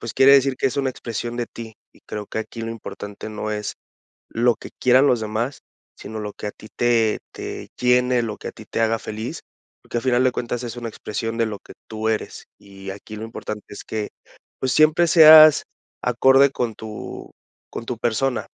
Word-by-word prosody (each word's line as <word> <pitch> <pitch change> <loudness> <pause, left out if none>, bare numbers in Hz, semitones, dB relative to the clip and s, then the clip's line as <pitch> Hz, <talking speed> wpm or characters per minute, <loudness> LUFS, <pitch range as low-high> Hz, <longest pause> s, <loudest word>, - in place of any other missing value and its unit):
pues, 115 - -5
quiere 135 +1 +7
decir 135 -1 +4
que - - 0
es 130 - -2
una 135 -2 +1
expresión 120 -1 -5
de 120 -1 -2
ti. 110 -2 -10 0.2
Y - - -23
creo 105 -1 -6
que - - -5
aquí 115 +1 -6
lo 115 - -4
importante 105 -2 -8
no 110 0 -4
es 105 -1 -4 0.6
lo 120 +1 +2
que - - -11
quieran 130 +3 +5
los 120 -4 +3
demás, 110 +5 -2 0.4
sino 110 0 -8
lo 105 -1 -5
que - - -8
a - - -2
ti 110 - -14
te 115 -3 +2
te - - -7
llene, 125 0 +3
lo 110 -2 -4
que - - -6
a - - -7
ti - - -13
te - - -3
haga 115 0 +2
feliz, 110 +2 -6 0.5
que 120 - 0
a - - -2
final 125 0 +2
de 130 - +3
cuentas 120 0 -3
es 120 -1 -6
una 120 -1 -4
expresión 115 +1 -4
de 115 - +2
lo 105 -2 -5
que - - -15
tú 110 0 -3
eres, 110 -1 -3
y 95 -1 -13
aquí 100 +2 -9
lo 110 - -6
importante 110 -2 -7
es 105 - -9
que, 110 -1 -4 0.5
pues, 130 -1 0
siempre 155 +3 +4
seas 155 -2 +9 0.4
acorde 135 +3 +5
con 120 -4 -2
tu 110 -1 -8 0.4
con 115 - -6
tu 120 -3 -4
persona, 120 +3 0
115 Hz, 210 wpm, -22 LUFS, 110-125 Hz, 0.6 s, seas